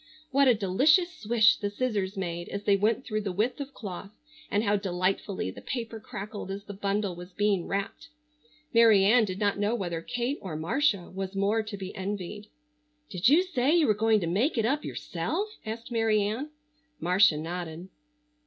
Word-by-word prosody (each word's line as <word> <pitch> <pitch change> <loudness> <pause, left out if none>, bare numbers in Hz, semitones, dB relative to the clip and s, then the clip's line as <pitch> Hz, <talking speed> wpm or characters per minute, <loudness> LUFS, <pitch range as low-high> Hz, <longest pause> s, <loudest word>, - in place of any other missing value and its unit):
What 275 +1 +4
a 245 - +6
delicious 285 - +3
swish 230 -6 +3
the 205 - -2
scissors 205 -3 -2
made 175 -2 -4
as 200 0 -5
they 200 - +4
went 215 +5 +1
through 215 -2 -2
the 200 -2 -3
width 220 +9 -1
of 280 0 -6
cloth, 195 -6 -7 0.4
and 205 +1 +1
how 205 -1 +2
delightfully 190 - -1
the - - -11
paper 230 -3 -5
crackled 205 -1 -7
as 195 +1 -5
the 200 - -8
bundle 200 -1 -1
was 180 +1 -10
being 200 -2 +1
wrapped! 195 -6 -3 0.7
Mary 225 -4 +6
Ann 225 +2 +5
did 185 -2 -5
not 205 -1 0
know 210 +3 +1
whether 175 -6 -3
Kate 245 - -2
or 180 -5 -5
Marcia 185 - 0
was 190 +1 -5
more 200 +3 +2
to 215 -1 -7
be 190 -1 -7
envied. 200 +1 -5 0.6
"Did 185 +4 +3
you 320 +6 +6
say 300 -4 +1
you 335 -3 +4
were 215 - +4
going 220 +1 +3
to - - -1
make 210 - +1
it 225 - +2
up 280 +6 0
yourself?" 425 +2 -3 0.2
asked 230 +2 -6
Mary 225 -2 +2
Ann. 225 +9 -3 0.5
Marcia 180 -1 +4
nodded. 170 +2 -5
205 Hz, 185 wpm, -28 LUFS, 190-230 Hz, 0.7 s, a